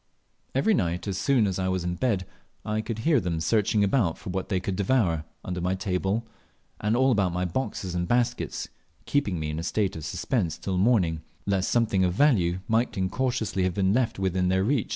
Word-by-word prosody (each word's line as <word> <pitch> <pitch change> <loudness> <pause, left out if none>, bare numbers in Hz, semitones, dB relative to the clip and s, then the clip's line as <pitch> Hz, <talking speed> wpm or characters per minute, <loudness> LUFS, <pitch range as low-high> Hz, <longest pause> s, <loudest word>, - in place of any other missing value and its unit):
Every 140 +12 +3
night, 90 - -1
as 95 -1 -2
soon 130 -6 +3
as 95 -2 -1
I 95 - 0
was 95 -1 0
in 90 0 -1
bed, 100 -2 0 0.4
I 110 0 -1
could 110 0 -4
hear 155 -5 +5
them 85 -5 -2
searching 105 +4 +2
about 100 -5 +2
for 95 - -7
what 95 0 -3
they 95 - +1
could 95 +1 -3
devour, 95 -7 +1 0.2
under 90 -1 -3
my 90 +2 0
table, 95 +4 -1 0.5
and 105 +2 +1
all 130 +1 +4
about 100 -6 +2
my 90 +1 -1
boxes 95 -1 -3
and 90 0 -1
baskets, 120 0 0 0.4
keeping 105 - 0
me 75 -1 -2
in 75 - -3
a - - -2
state 100 +3 0
of 80 - -6
suspense 85 - -1
till 95 -2 -2
morning, 90 -7 +2 0.2
lest 100 -1 +1
something 110 -5 +2
of 90 -1 +2
value 95 - +3
might 115 0 +1
incautiously 110 +1 -1
have 90 -1 0
been 95 -1 +2
left 125 0 +1
within 95 -1 0
their 95 +1 +2
read. 125 +1 +1
95 Hz, 205 wpm, -26 LUFS, 90-115 Hz, 0.5 s, hear